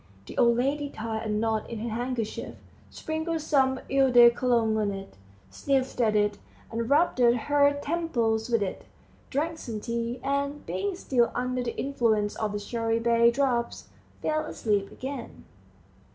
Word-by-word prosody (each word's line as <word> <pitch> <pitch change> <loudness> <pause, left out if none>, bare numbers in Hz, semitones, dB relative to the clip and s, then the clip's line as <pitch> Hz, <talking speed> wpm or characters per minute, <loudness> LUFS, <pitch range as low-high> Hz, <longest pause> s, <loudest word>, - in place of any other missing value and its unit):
The - - -10
old 235 -1 +4
lady 285 +3 0
tied 220 -2 -4
a - - -3
knot 220 +1 -1
in 230 - -5
her 230 +2 -4
handkerchief, 235 -1 -3 0.3
sprinkled 315 +1 -3
some 265 -3 +2
eau 270 -1 +4
de 240 -1 +8
Cologne 235 -3 +1
on 215 -2 +1
it, 195 - -7 0.4
sniffed 265 -2 -1
at 215 -2 +2
it, 205 -1 +1 0.3
and 230 +1 -3
rubbed 295 -1 +3
her 285 +4 +3
temples 245 -9 0
with 230 -3 +2
it, 190 - -5 0.4
drank 320 +4 -2
some 225 -3 -5
tea, 235 +2 -3
and, 280 +1 -2
being 400 -1 -2
still 245 -8 +1
under 250 0 -1
the 240 -1 -4
influence 225 -6 0
of 215 -2 -2
the - - -1
cherrybay 230 +2 +2
drops, 245 -2 -1 0.3
fell 310 0 0
asleep 205 -8 -1
again. 265 -1 -7
240 Hz, 150 wpm, -27 LUFS, 225-275 Hz, 0.4 s, de